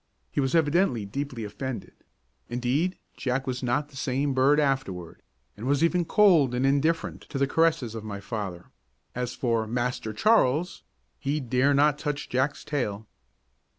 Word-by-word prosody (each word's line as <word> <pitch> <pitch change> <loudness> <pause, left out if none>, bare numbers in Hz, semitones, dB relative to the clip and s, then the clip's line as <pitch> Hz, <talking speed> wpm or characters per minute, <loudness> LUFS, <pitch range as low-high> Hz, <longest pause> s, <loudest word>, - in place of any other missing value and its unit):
He - - -2
was 135 +3 0
evidently 155 - +2
deeply 130 +2 -4
offended; 125 +4 -5 0.6
indeed, 125 +9 0 0.2
Jack 135 +1 -1
was 130 -1 -3
not 130 +4 0
the 140 - -17
same 135 +1 -1
bird 135 +3 +4
afterward, 115 - -1 0.3
and 110 +5 -6
was 140 +3 +2
even 175 +1 +2
cold 165 - +4
and 125 +2 +1
indifferent 145 +4 +1
to 140 - -4
the 140 - +3
caress 160 0 +2
of 115 -2 -6
my 100 -2 -5
father; 100 -4 -6 0.4
as 125 0 -3
for 115 -3 0
"Master 120 -1 -2
Charles," 175 - +2 0.4
he 145 +2 -1
dare 130 +2 +2
not 145 +1 +3
touch 150 -1 -3
Jack's 130 +3 0
tail. 110 -8 -2
135 Hz, 150 wpm, -27 LUFS, 120-145 Hz, 0.6 s, bird